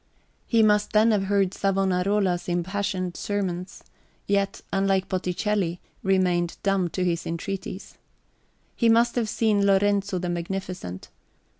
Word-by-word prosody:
He 230 -2 +4
must 210 -1 +3
then 220 +2 +5
have 200 -2 +1
heard 195 -1 +1
Savonarola's 190 -1 +1
impassioned 185 0 -2
sermons, 185 -3 -3 0.4
yet, 200 -1 0
unlike 195 -1 +1
Botticelli, 185 -1 -1 0.2
remained 180 -3 +1
dumb 195 -3 +1
to 180 +3 -2
his 170 -1 -1
entreaties. 190 +3 -5 0.8
He 235 - +3
must 235 +1 +4
have 230 -3 -1
seen 210 -2 +2
Lorenzo 200 0 +2
the 180 0 -3
Magnificent. 175 - -5
195 Hz, 120 wpm, -25 LUFS, 180-205 Hz, 0.8 s, then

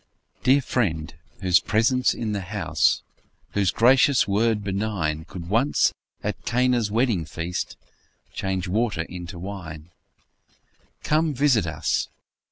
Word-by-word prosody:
Dear 135 +3 +4
Friend! 80 -12 -1 0.3
whose 90 -3 +4
presence 115 +5 +2
in 110 -2 -3
the 100 -1 -2
house, 90 -5 +1 0.5
Whose 100 -3 +1
gracious 130 +4 +4
word 105 +1 +1
benign, 95 -6 -2
Could 85 -1 -8
once, 115 +9 +2 0.3
at - - -3
Cana's 125 -2 +1
wedding 110 -5 +1
feast, 85 +3 -4 0.6
Change 95 -1 -2
water 105 -3 0
into 90 +1 -8
wine; 85 -4 -8 1.1
Come, 155 -1 +1
visit 125 -9 +3
us! 75 -1 -1
100 Hz, 115 wpm, -24 LUFS, 85-120 Hz, 1.1 s, Dear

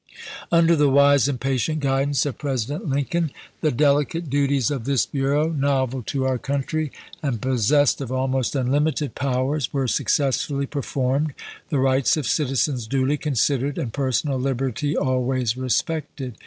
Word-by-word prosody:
Under 170 0 +5
the 145 -2 +3
wise 140 -1 +5
and 135 -3 -2
patient 135 +4 -1
guidance 135 +1 +1
of 145 - -4
President 140 +2 -3
Lincoln 145 +4 0 0.3
the 155 - +1
delicate 145 +3 +1
duties 140 -3 +1
of 130 -6 -3
this 135 -3 +2
bureau, 145 +3 0
novel 135 -3 0
to 135 -2 -1
our 130 -1 0
country, 140 +3 -2 0.3
and 135 -7 -2
possessed 130 +4 +2
of 130 -3 -5
almost 130 0 -1
unlimited 145 +3 0
powers, 135 +1 -1
were 135 -2 -1
successfully 140 +2 0
per 140 +1 -4
formed, 135 +3 -1 0.3
the 150 - 0
rights 130 -1 +2
of 150 - -2
citizens 135 -2 0
duly 135 +3 +1
considered, 140 -1 0
and 115 -4 -3
personal 135 0 0
liberty 135 +2 -1
always 130 -3 0
respected. 130 -1 -2
135 Hz, 145 wpm, -23 LUFS, 130-145 Hz, 0.3 s, Under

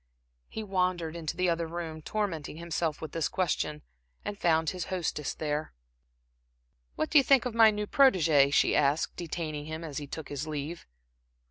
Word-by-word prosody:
He 220 - -5
wandered 180 -4 -1
into 165 -1 -4
the 180 0 +2
other 165 -1 0
room, 160 -1 -5
tormenting 165 -6 -3
himself 165 -2 -2
with 160 -2 -6
this 165 -2 0
question, 150 -4 -1 0.4
and 205 - -3
found 160 -4 +2
his 180 -2 -4
hostess 170 -5 -2
there. 150 0 -3 1.2
"What 155 - -2
do 300 - +8
you - - +3
think 265 -2 +4
of 250 - -2
my 225 -1 +7
new 210 0 -2
protegé?" 165 - +4
she - - +3
asked, 145 +1 +2
detaining 155 -3 -4
him 160 +1 -6
as 150 -4 -4
he 145 - -7
took 155 0 -7
his 145 +2 -4
leave. 155 +2 -5
165 Hz, 170 wpm, -29 LUFS, 150-185 Hz, 1.2 s, do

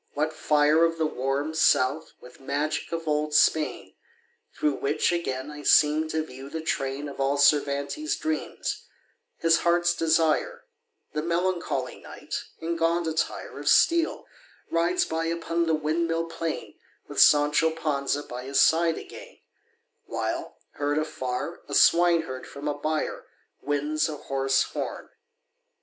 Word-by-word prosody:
what 155 +2 0
fire 150 +1 +3
Of 165 0 +1
the 160 - +1
"warm 140 +2 -2
South" 155 -1 +2
with 125 - -15
magic 145 +3 -2
of 165 -1 -4
old 150 0 0
Spain! 150 -10 +2 0.6
Through 150 -2 -1
which 145 +4 +1
again 150 -5 -3
I 150 0 -9
seem 150 +2 +4
to 155 0 -1
view 135 0 -10
the 160 +2 -5
train 135 -1 -2
Of 140 - -9
all 135 +1 +1
Cervantes' 145 - +2
dreams, 315 -1 -4 0.5
his 165 0 +3
heart's 175 0 +2
desire: 165 - +1 0.5
The 150 - -1
melancholy 170 -5 -2
Knight, - - -11 0.3
in 165 +1 -3
gaunt 165 +1 +1
attire 160 0 -3
Of - - 0
steel 335 -1 +3 0.5
rides 170 +2 +2
by 160 0 -2
upon 170 0 -1
the 160 - +3
windmill 165 +2 -1
plain 165 -1 -5 0.3
With - - 0
Sancho 150 +2 +5
Panza 145 -3 -2
by 125 -1 -8
his 135 +1 0
side 165 0 +4
again, - - -11 0.7
While, - - -3 0.2
heard 145 +1 -1
afar, 155 0 -3
a - - -3
swineherd 165 -6 +3
from 145 +1 -7
a 145 - 0
byre 155 +2 -3 0.3
Winds 150 +2 0
a 150 - -5
hoarse 135 -1 +1
horn. - - -6
155 Hz, 140 wpm, -26 LUFS, 145-165 Hz, 0.7 s, Sancho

